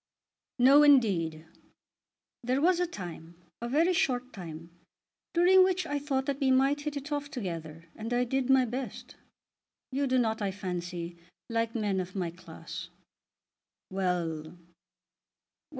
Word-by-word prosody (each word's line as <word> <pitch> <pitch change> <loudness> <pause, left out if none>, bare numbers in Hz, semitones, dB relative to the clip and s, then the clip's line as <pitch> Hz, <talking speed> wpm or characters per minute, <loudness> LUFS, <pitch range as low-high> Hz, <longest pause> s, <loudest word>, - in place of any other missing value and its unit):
"No, 270 +4 +7
indeed." 190 - +4 1.0
"There 255 +3 +1
was 350 +3 +3
a 355 - +1
time, 175 - -8 0.3
a 235 - -3
very 325 +7 +3
short 255 -6 0
time, 165 -3 -9 0.6
during 370 +2 +6
which 365 -1 +1
I 290 -2 -2
thought 275 -2 -1
that 280 0 -2
we 270 -2 +2
might 270 +3 +3
hit 295 0 -3
it 285 +2 -7
off 290 -1 -2
together, 165 - -6
and 225 +2 -6
I 245 0 +2
did 265 +1 -1
my 265 -1 +5
best. 250 +2 -6 0.8
You 275 +1 0
do 260 0 +2
not, 220 -2 +1
I 200 - 0
fancy, 175 -3 -5 0.3
like 230 0 0
men 205 -4 0
of 185 +1 -5
my 180 -3 -2
class." 175 - -9 1.0
"Well; 180 -4 -1
well! 165 +3 -13
245 Hz, 145 wpm, -29 LUFS, 180-280 Hz, 1.0 s, No